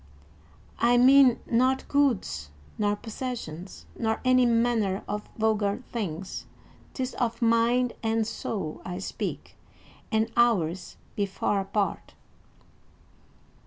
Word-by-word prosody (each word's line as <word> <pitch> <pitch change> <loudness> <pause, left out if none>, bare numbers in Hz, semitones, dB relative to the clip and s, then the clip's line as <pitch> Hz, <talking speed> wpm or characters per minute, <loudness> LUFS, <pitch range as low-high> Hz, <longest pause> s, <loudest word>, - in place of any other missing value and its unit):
"I 240 +1 +4
mean 260 0 +6
not 255 +3 +1
goods 235 - +1 0.3
nor 205 0 +2
possessions, 210 -7 -6
nor 220 -1 -1
any 255 -1 +5
manner 230 -4 +1
of 210 +1 -4
vulgar 215 0 +1
things; 190 -5 -4 0.5
'tis 260 -1 -3
of 235 -2 -2
mind 235 +1 +3
and 225 0 +1
soul 195 -7 -4
I 180 -1 -5
speak, 190 - -5 0.5
and 220 0 +1
ours 190 -7 +1 0.2
be 200 -1 0
far 195 +1 -1
apart." 200 +1 -2
225 Hz, 105 wpm, -27 LUFS, 200-245 Hz, 0.5 s, mean